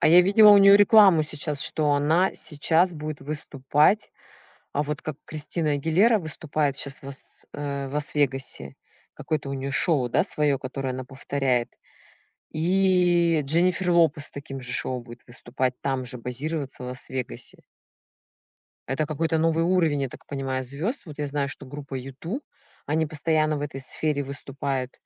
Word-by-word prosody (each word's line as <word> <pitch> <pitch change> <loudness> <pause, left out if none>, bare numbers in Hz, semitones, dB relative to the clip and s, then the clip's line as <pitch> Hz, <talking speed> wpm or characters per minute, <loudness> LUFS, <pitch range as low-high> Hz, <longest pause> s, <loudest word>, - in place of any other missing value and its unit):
А - - +3
я 175 +2 +8
видела 205 +3 +7
у 205 - +8
неё 200 0 +8
рекламу 205 -6 +6
сейчас, 150 -1 0
что 150 -2 +2
она 160 +6 +2
сейчас 165 +4 +1
будет 155 -2 -6
выступать. 150 +5 +1 0.6
А, 145 - 0
вот 150 0 -4
как 155 -3 -5
Кристина 155 0 -2
Агилера 170 +11 +3
выступает 155 -4 -2
щас 140 -1 -5
в 135 - -8
с 135 - -8
э, 140 -1 -4
в - - -10
Лас-Вегасе. 135 - -1 0.4
Какое-то 150 -3 -3
у 140 - -3
неё 135 +1 -4
шоу, 135 -4 +1
да, - - +2
своё, 145 -3 0
которое 130 0 -4
она 130 0 -5
повторяет? 130 -2 -1 0.8
И 175 -1 +3
Дженнифер 180 +4 +1
Лопес 165 -4 +3
с - - -6
таким 135 -1 -8
же 125 0 -1
шоу 130 -1 -1
будет 120 0 -13
выступать, 125 +1 -3
там 135 -2 -2
же, 125 0 -4
базироваться 135 +2 -4
в - - -6
Лас-Вегасе. 125 - -6 1.3
Это 135 +4 -1
какой-то 160 +2 -1
новый 165 +1 +2
уровень, 165 -5 +2
я 135 - -3
так - - -13
понимаю, 135 -2 -3
звёзд. 165 - -4
Вот 150 -4 -10
я 145 - -1
знаю, 140 0 -1
что 145 - -7
группа 140 0 -8
U2- 135 - -6 0.5
они 160 +2 +1
постоянно 155 0 0
в - - -5
этой 140 -2 -5
сфере 145 +1 -1
выступают, 135 -1 -4
145 Hz, 160 wpm, -25 LUFS, 135-165 Hz, 1.3 s, я